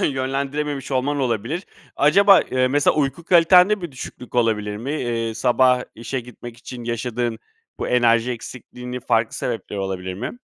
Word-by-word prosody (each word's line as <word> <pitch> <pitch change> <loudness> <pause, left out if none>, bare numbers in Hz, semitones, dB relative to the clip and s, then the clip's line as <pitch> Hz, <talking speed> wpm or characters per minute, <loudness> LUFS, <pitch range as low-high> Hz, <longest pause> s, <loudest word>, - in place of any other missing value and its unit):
yönlendirememiş 140 +1 -2
olman 140 +3 0
olabilir. 125 - -2 0.3
Acaba, 195 +7 +6
ııı, 130 0 +2
mesela 145 +1 +2
uyku 145 +2 -1
kalitende 180 +3 +5
bir 170 -5 -6
düşüklük 125 -1 -10
olabilir 105 -3 +1
mi? 130 +7 -4
Iıı, 115 -2 -2
sabah 125 +2 +3
işe 120 +4 -4
gitmek 120 -1 -11
için 120 0 -9
yaşadığın 120 0 -2 0.4
bu - - -3
enerji 120 0 +3
eksikliğinin 125 +1 -8
farklı 115 -1 +1
sebepleri 110 -4 -4
olabilir 95 -1 -4
mi? 125 - -6
125 Hz, 145 wpm, -21 LUFS, 115-140 Hz, 0.4 s, Acaba